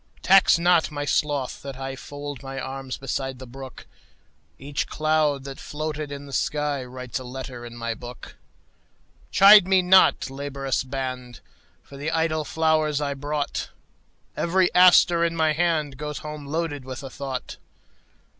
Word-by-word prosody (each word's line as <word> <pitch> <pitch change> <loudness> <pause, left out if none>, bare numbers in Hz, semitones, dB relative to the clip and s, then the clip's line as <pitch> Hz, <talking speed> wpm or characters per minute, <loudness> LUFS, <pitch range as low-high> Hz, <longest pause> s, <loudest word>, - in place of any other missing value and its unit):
Tax 195 -2 +6
not 170 -1 +3
my 145 -1 -4
sloth 145 -3 -1
that 140 -1 -7
IFold 135 +1 -7
my 135 -1 -6
arms 135 0 -5
beside 135 0 -4
the 130 - -9
brook; 130 +1 -10 0.7
Each 140 +1 -3
cloud 155 -3 +1
that 135 -1 -8
floated 150 -1 -5
in 140 0 -7
the 140 - -11
skyWrites 135 -4 -2
a - - -8
letter 125 -1 -7
in 120 0 -9
my 115 0 -3
book. 120 +2 -10 1.0
Chide 200 -1 +8
me 190 -1 +4
not, 180 -6 +5
laborious 135 -1 -3
band, 130 -2 -5 0.4
For 140 - -13
the 145 +3 -3
idle 160 -1 0
flowers 155 -1 +1
I 145 -1 -1
brought; 145 +1 -3 0.7
Every 180 +1 +1
aster 175 -1 +6
in 165 0 0
my 160 -1 +2
handGoes 150 -3 -1
home 150 -1 -7
loaded 150 -2 -3
with 130 +1 -7
a 135 - -6
thought. 135 -2 -6
145 Hz, 145 wpm, -24 LUFS, 135-155 Hz, 1.0 s, Chide